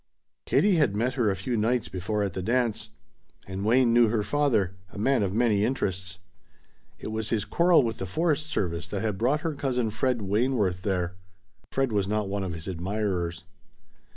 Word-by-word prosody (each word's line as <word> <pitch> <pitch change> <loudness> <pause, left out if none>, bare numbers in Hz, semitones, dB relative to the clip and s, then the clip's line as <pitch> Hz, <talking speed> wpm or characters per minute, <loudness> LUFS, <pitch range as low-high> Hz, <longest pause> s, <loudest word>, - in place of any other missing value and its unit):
Katie 200 -4 +3
had 135 -10 +2
met 120 +4 0
her 120 -5 +1
a 95 - 0
few 95 +6 -3
nights 115 +2 +1
before 100 +3 -2
at 100 -3 -2
the 95 - -3
dance. 120 +2 0 0.6
And 95 +1 -5
Wayne 120 +2 +4
knew 120 -1 +6
her 110 -1 0
father 115 -10 +1 0.2
a - - -12
man 130 +5 +2
of 100 -2 0
many 110 -2 +2
interests. 95 -6 -2 0.8
It - - -7
was 110 0 -2
his 110 -3 0
quarrel 170 -3 +4
with 115 -1 -3
the 95 - -3
forest 155 - 0
service 85 - -2
that 100 +2 -3
had 105 -4 -2
brought 135 +6 +2
her 165 0 -2
cousin 125 -5 -1
Fred 125 +1 0
Wayneworth 105 -3 +1
there. 90 -3 -2 0.5
Fred 135 -2 0
was 100 -2 +1
not 105 0 -1
one 100 0 -2
of 90 -3 -3
his 80 +1 -8
admirers. 90 -2 -2
105 Hz, 185 wpm, -27 LUFS, 95-125 Hz, 0.8 s, knew